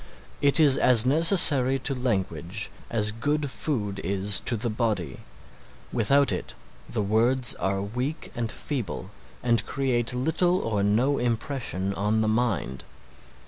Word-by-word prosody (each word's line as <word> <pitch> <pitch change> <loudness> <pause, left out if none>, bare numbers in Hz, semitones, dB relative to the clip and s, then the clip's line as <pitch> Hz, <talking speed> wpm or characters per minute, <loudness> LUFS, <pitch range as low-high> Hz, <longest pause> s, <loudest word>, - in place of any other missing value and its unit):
It 140 +2 +2
is 145 -4 +6
as 125 -2 +5
necessary 145 -3 +6
to 135 +1 -1
language 100 - -3 0.2
as 105 -2 +1
good 145 +5 -2
food 110 -6 -4
is 100 +1 0
to 120 - -1
the 115 +1 -3
body. 105 - -3 0.7
Without 135 +4 +2
it - - -5 0.3
the 105 - -2
words 120 +4 +3
are 95 0 -3
weak 125 +9 -5
and 115 -2 -4
feeble 110 - -6 0.3
and 120 -2 +1
create 125 -3 -2
little 165 +7 0
or 110 - -2
no 115 +8 +1
impression 115 -5 -3
on 105 +3 -1
the 110 - 0
mind. 110 - -2
120 Hz, 135 wpm, -25 LUFS, 105-135 Hz, 0.7 s, is